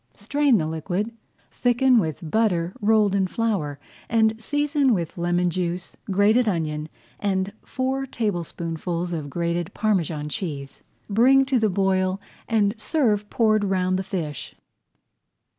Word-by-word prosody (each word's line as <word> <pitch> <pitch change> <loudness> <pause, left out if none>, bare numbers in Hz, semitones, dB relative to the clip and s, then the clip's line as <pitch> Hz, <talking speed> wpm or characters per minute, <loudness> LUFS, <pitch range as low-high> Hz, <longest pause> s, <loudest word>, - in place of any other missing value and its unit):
Strain 275 +4 +2
the 160 - 0
liquid, 175 +7 -2 0.4
thicken 245 0 +3
with 160 -3 -3
butter 180 -5 +1
rolled 210 -1 +3
in 195 -1 +2
flour, 185 -10 -1 0.3
and 220 -1 +3
season 290 -1 +2
with 170 -4 -3
lemon 175 0 +1
juice, 175 0 -3
grated 210 +5 +3
onion, 155 -4 -2 0.3
and 195 -1 -1
four 265 +1 -2
tablespoonfuls 175 -5 -3
of 150 -4 -4
grated 170 +2 -1
[Page - - -19
94] - - -17
Parmesan 165 -8 0
cheese. 145 -7 -5 0.3
Bring 255 +6 +5
to 265 -2 +2
the 220 -1 +2
boil 190 0 +1 0.3
and 210 -2 +2
serve 215 -7 +1
poured 215 -2 +2
around 185 -1 +1
the 190 - -2
fish. 165 -8 -5
195 Hz, 135 wpm, -24 LUFS, 170-225 Hz, 0.4 s, Bring